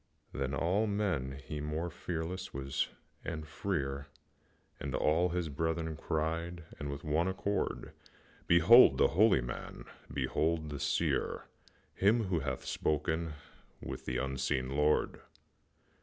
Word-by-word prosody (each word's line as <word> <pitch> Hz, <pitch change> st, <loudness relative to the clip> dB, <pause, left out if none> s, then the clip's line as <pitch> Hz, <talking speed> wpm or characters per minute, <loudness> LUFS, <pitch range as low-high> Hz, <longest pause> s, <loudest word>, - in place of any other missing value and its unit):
Than 70 Hz, +1 st, -2 dB
all 95 Hz, +10 st, +1 dB
men 95 Hz, -11 st, -1 dB
he 75 Hz, -2 st, -4 dB
more 80 Hz, +3 st, -2 dB
fearless 90 Hz, +2 st, -4 dB
was 70 Hz, 0 st, -1 dB, 0.4 s
and 80 Hz, -2 st, -5 dB
freer, 70 Hz, -5 st, -2 dB, 0.7 s
And 70 Hz, -1 st, -3 dB
all 85 Hz, +4 st, +3 dB
his 90 Hz, -1 st, -1 dB
brethren 80 Hz, +2 st, -2 dB
cried 80 Hz, +2 st, -2 dB, 0.2 s
with 70 Hz, -1 st, -4 dB
one 80 Hz, +3 st, +1 dB
accord, 100 Hz, +2 st, -2 dB, 0.6 s
"Behold 85 Hz, -, +8 dB
the -, -, +5 dB
holy 95 Hz, -, +5 dB
man! -, -, -6 dB, 0.3 s
Behold 80 Hz, 0 st, 0 dB
the 70 Hz, -, -4 dB
Seer! -, -, 0 dB, 0.5 s
Him 110 Hz, +4 st, +3 dB
who 95 Hz, -4 st, 0 dB
hath -, -, -3 dB
spoken 80 Hz, +2 st, -1 dB, 0.5 s
with 65 Hz, 0 st, -7 dB
the 60 Hz, -, -1 dB
unseen 65 Hz, 0 st, -1 dB
Lord!" 75 Hz, +1 st, +2 dB
80 Hz, 120 wpm, -33 LUFS, 70-90 Hz, 0.7 s, Behold